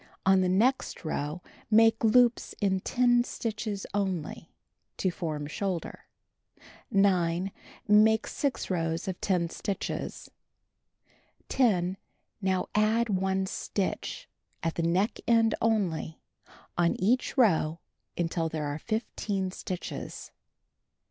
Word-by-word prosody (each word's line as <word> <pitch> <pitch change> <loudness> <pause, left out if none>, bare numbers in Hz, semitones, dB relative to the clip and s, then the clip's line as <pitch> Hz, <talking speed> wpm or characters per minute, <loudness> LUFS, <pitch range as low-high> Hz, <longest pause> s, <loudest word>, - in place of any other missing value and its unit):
On 190 0 +5
the 185 - +2
next 225 +1 +1
row 155 +2 -3 0.3
make 225 +1 +5
loops 240 +1 +4
in 190 -2 +1
10 245 +3 +3
stitches 215 -4 -4
only 185 -5 -2 0.2
— - - -52
to 185 - +1
form 155 -4 -4
shoulder. 175 +3 -4 0.8
9. 185 -2 +2 0.4
Make 220 +1 +5
6 280 -8 -2
rows 165 0 -1
of 185 -2 -4
10 175 -4 +1
stitches. 200 - -4 1.2
10. 190 -7 +2 0.4
Now 190 -1 0
add 220 +2 +2
1 190 0 +1
stitch, 190 0 -3 0.4
at 165 0 0
the - - -2
neck 180 +6 +1
end 225 -1 +4
only, 190 -8 0 0.6
on 170 -1 +1
each 240 +9 +1
row 170 -9 +3 0.4
until 165 -1 0
there 155 -1 -3
are 145 +1 -3
15 205 -2 -2
stitches. 185 -1 -6
190 Hz, 110 wpm, -29 LUFS, 170-220 Hz, 1.2 s, On